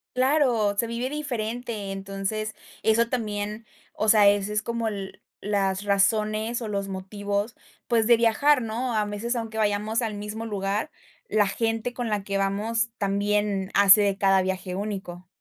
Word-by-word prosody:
Claro, 255 -6 +2
se 235 - +2
vive 235 +3 -3
diferente, 235 -7 -4
entonces 195 +3 -4 0.3
eso 230 +1 +3
también, 215 -2 -3 0.3
o 215 - -2
sea, 210 -2 +7
ese 205 +1 +1
es 210 0 0
como 235 0 -2
el 200 -3 -5 0.2
las 195 -1 0
razones 215 +3 +1
o 220 - -4
los 200 -1 -2
motivos, 200 +3 -3 0.3
pues, 225 -2 +2
de 240 -1 +6
viajar, 250 +4 +3
¿no? 230 +2 -2
A 210 - +2
veces, 210 +4 -3
aunque 225 -1 -4
vayamos 210 +1 +1
al 225 -3 -2
mismo 210 +2 -5
lugar, 200 0 -2 0.4
la 210 -1 +3
gente 225 +3 -1
con 245 -1 -3
la 210 -2 -1
que 200 0 -2
vamos, 215 +4 0
también 200 -1 0
hace 200 +1 +7
de 200 -1 +1
cada 195 -1 +4
viaje 185 -1 -3
único. 190 -3 -5
210 Hz, 160 wpm, -25 LUFS, 200-230 Hz, 0.4 s, sea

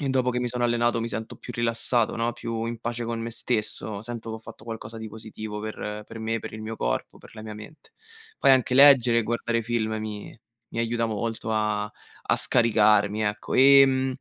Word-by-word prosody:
e 140 - -1
dopo 130 -1 +1
che 125 - -2
mi 125 - -1
sono 125 0 -3
allenato 120 0 +1
mi 115 - -3
sento 110 0 -6
più - - -9
rilassato, 115 0 +1
no, 115 +1 -1
più 115 -1 -4
in 115 0 -5
pace 120 0 -4
con 115 0 -3
me 115 +1 -4
stesso, 110 -3 -1
sento 115 0 -7
che 110 - -5
ho - - -11
fatto 110 -1 -13
qualcosa 115 0 -7
di 110 - -7
positivo 110 -1 -8
per 105 -1 -6
per 115 - -10
me, 115 +1 -2
per - - -8
il 110 - -8
mio 110 +1 -6
corpo, - - -3
per - - -16
la 110 - -9
mia 110 - -7
mente. 140 +8 -13 0.5
Poi 135 - +5
anche 130 -1 +2
leggere 130 -4 +7
e - - +1
guardare 115 +1 -1
film 110 -1 -1
mi 105 +1 -7 0.3
mi - - -6
aiuta 115 0 0
molto 115 +1 -4
a 105 -1 0
a 105 - -5
scaricarmi, 105 -2 +4
ecco. 105 0 -3
Ehm, 135 -1 +5
115 Hz, 210 wpm, -25 LUFS, 110-120 Hz, 0.5 s, leggere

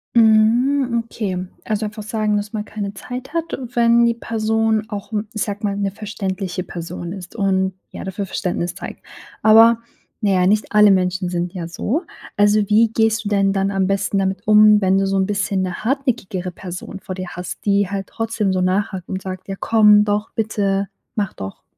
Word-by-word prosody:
Mhm 235 +3 +4
okay. 185 -5 -4 0.2
Also 215 0 -1
einfach 210 0 -6
sagen, 215 -1 0
dass 205 0 -2
man 210 0 -3
keine 205 -2 -5
Zeit 250 - -8
hat 335 0 -2
und 250 -2 -6
wenn 235 0 +5
die 235 - +3
Person 220 -1 0
auch, 205 +1 -6 0.2
ich 215 - -3
sage 205 -1 -2
mal 200 -1 0
'ne 200 -1 -1
verständliche 195 -3 -4
Person 175 0 -6
ist 185 -2 -10
und 190 -2 +1 0.2
ja - - -7
dafür 190 +1 -4
Verständnis 180 -2 -3
zeigt. - - -9 0.4
Aber 225 +1 +7 0.4
na 200 - +3
ja, 180 -1 +3
nicht 210 +2 +1
alle 210 -1 +7
Menschen 185 -1 +1
sind 175 +1 -2
ja 170 -3 -5
so. 245 - -2 0.3
Also 205 +1 +4
wie 220 +1 +5
gehst 225 0 +1
du 205 - -1
denn 195 -1 +2
dann 195 0 0
am 190 -1 +1
besten 195 0 0
damit 190 0 -1
um 210 0 +7
wenn 190 0 +3
du 195 0 +1
so 195 - 0
'n 190 - +2
bisschen 205 -1 -1
'ne 185 +2 -4
hartnäckigere 235 -9 -1
Person 180 +1 -8
vor 185 - -7
dir 185 -1 -6
hast, 180 +3 -7
die 200 -1 +2
halt 195 -1 -4
trotzdem 225 -3 -1
so 185 - 0
nachhakt 190 0 -1
und 190 -1 -4
sagt: 185 0 -7
„Ja 195 - -4
komm 210 -2 +5
doch, 210 +1 -1
bitte. 200 -3 -1 0.3
Mach 200 -3 -1
doch." 95 0 -8
205 Hz, 195 wpm, -20 LUFS, 190-220 Hz, 0.4 s, Aber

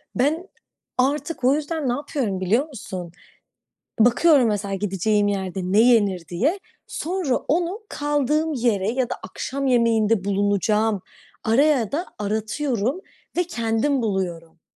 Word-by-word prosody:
Ben 310 +8 +1 0.5
artık 285 +2 0
o 265 +3 +5
yüzden 300 -2 -2
ne - - +2
yapıyorum, 255 - -2
biliyor 225 - +1
musun? 185 - -7 0.9
Bakıyorum 250 +3 +5
mesela, 205 -2 -1
gideceğim 205 +1 +1
yerde 190 -2 -2
ne 185 +4 +2
yenir, 205 -8 +3
diye. 280 - 0 0.3
Sonra 340 -6 -1
onu, 350 +6 -1
kaldığım 295 +2 0
yere 225 -5 +1
ya 250 0 -1
da - - -2
akşam 270 +8 -4
yemeğinde 230 -4 +3
bulunacağım 205 +1 +1 0.4
araya 255 0 +3
da 335 +6 -1
aratıyorum 220 - -1 0.4
ve 355 - +3
kendim 235 -1 0
buluyorum. 175 -6 -3
230 Hz, 120 wpm, -23 LUFS, 200-290 Hz, 0.9 s, o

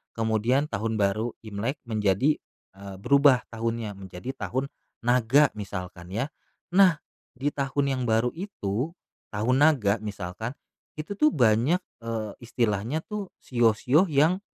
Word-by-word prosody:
kemudian 115 +5 +1
Tahun 110 +2 -2
Baru 105 +4 0
Imlek 110 +7 -3
menjadi, 110 +6 +2 0.4
eee, 100 -1 -8
berubah 140 +1 +5
tahunnya, 115 -2 -3
menjadi 95 +7 -7
Tahun 130 +2 -2 0.4
Naga 125 +4 +4
misalkan 90 -3 -6
ya, 135 +7 -1 0.4
nah 185 -3 +6 0.4
di 140 +4 0
tahun 140 0 -1
yang 130 - -1
baru 115 +2 +3
itu, 160 - -3 0.4
Tahun 115 +5 +1
Naga 130 -9 +4
misalkan, 105 +2 -5 0.4
itu 155 +6 -4
tuh 305 - +6
banyak, 125 +8 +3 0.2
eee, 110 -2 -3
istilahnya 120 +4 -1
tuh 210 -3 -5
shio-shio 125 - +3
yang, 155 +6 +3
115 Hz, 125 wpm, -26 LUFS, 105-140 Hz, 0.4 s, nah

